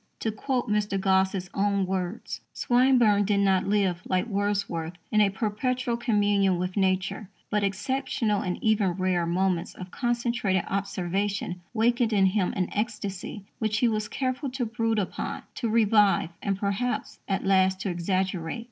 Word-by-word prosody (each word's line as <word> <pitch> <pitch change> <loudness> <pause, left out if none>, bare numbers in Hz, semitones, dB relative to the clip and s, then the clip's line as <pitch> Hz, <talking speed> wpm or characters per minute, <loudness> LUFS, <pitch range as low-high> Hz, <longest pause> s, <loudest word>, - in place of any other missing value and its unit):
To 220 - 0
quote 250 +4 -2
Mr. 210 -2 0
Gosse's 190 -1 +1
own 200 -1 +1
words: 185 +3 -3
Swinburne 240 -5 +4
did 200 0 +1
not 190 -2 +2
live, 195 -4 +1
like 185 +2 +1
Wordsworth, 200 -6 -1 0.2
in 215 - +4
a 205 - +4
perpetual 240 +5 -1
communion 205 -5 +2
with 180 +1 -3
Nature, 190 0 0 0.2
but 210 -1 +1
exceptional, 215 +1 -1
and 180 -1 -2
even 210 -4 +2
rare, 180 -2 0
moments 180 0 0
of 180 0 -9
concentrated 235 -6 0
observation 195 -1 -2
wakened 235 0 +2
in 195 -2 +4
him 190 -1 +1
an 185 - 0
ecstasy 210 -2 -4
which 215 -1 0
he 240 - +3
was 215 -2 -1
careful 260 +3 -2
to 255 -1 -2
brood 225 0 -1
upon, 200 -3 -3
to 235 - -2
revive, 210 -5 +3
and 195 -1 -1
perhaps, 200 +5 -2
at 195 - -1
last, 190 -1 +3
to 195 - -2
exaggerate. 180 0 -1
200 Hz, 150 wpm, -27 LUFS, 190-225 Hz, 0.2 s, Swinburne